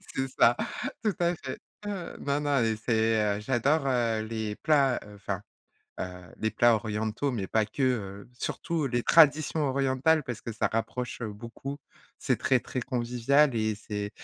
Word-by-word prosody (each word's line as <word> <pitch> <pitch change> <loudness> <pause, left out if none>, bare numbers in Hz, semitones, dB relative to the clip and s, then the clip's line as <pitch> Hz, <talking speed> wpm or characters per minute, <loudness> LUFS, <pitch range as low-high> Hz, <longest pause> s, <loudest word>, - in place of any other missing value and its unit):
C'est 135 0 0
ça, 120 - +6 0.5
tout 210 -3 +2
à 175 0 +2
fait. 130 -4 -7 0.3
Ouais, 195 -4 -5
non, 140 +1 0
non 145 -4 +2
et 110 -1 +1
c'est, 110 -2 +1
heu, - - -5
j'adore, 135 +6 +1
heu, 115 -4 +1
les 110 -1 -3
plats, 140 -5 +3 0.2
enfin, 100 -1 -4 0.6
heu, - - 0 0.3
les 110 - 0
plats 120 +2 +4
orientaux, 110 +5 -1
mais 105 -6 -3
pas 110 +2 +2
que, 135 - -4
heu, 100 -6 -1
surtout 165 -4 -2
les 120 -1 0
traditions 155 0 +5
orientales, 135 +3 +2
parce 120 -4 -5
que 115 - -6
ça 110 - 0
rapproche, 120 +3 -3
heu, 110 -3 -4
beaucoup, 115 +6 -7 0.4
c'est - - +1
très, 130 - +3
très 130 +1 -4
convivial 125 +3 +2
et 110 -1 +1
c'est 105 -1 -4
120 Hz, 170 wpm, -28 LUFS, 110-140 Hz, 0.6 s, ça